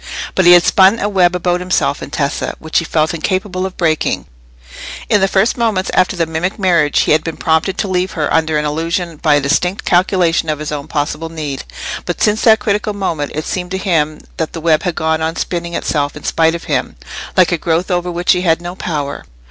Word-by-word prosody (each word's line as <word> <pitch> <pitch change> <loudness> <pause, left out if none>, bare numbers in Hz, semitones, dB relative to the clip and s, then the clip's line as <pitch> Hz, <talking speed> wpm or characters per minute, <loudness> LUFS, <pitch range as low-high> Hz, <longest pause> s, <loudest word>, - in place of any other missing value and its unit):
But 190 - +2
he 175 - +9
had 175 -1 +7
spun 190 +4 +5
a 205 - -1
web 185 -3 +2
about 180 0 0
himself 180 -5 0
and - - -8
Tessa, 140 0 -2
which 160 0 0
he 165 - -4
felt 155 0 0
incapable 185 +2 -2
of 190 - -12
breaking: 160 -3 0 0.8
in 205 - +3
the 195 - +4
first 195 +5 +1
moments 215 -5 0
after 185 0 +2
the 170 -2 0
mimic 160 +4 -3
marriage 170 -7 +2
he - - +1
had 155 +1 +3
been 165 - -5
prompted 160 +4 0
to 200 - -1
leave 185 0 -1
her 155 -3 -1
under 160 -1 +2
an 150 - -1
illusion 165 +2 -2
by 150 0 +3
a - - +4
distinct 180 +7 0
calculation 175 -3 +2
of 155 - 0
his 150 0 -5
own 145 0 -5
possible 155 +1 -3
need, 150 -4 -5 0.4
but 175 - -3
since 215 0 +2
that 220 -2 +6
critical 210 0 -1
moment 165 -7 -3
it 155 - -3
seemed 180 -1 -3
to 190 - -2
him 160 -6 0 0.2
that 160 - -3
the 165 - -5
web 155 -1 +3
had 180 -4 -2
gone 160 0 0
on 160 +1 -1
spinning 170 -1 -3
itself 145 -2 -1
in - - -11
spite 165 0 +2
of 170 - -6
him, - - -2 0.4
like 185 -1 +5
a 175 - +1
growth 170 +4 0
over 175 0 0
which 175 +1 +1
he 180 - +2
had 165 -3 +2
no 175 +1 -6
power. 150 -6 -4
170 Hz, 225 wpm, -16 LUFS, 160-185 Hz, 0.8 s, he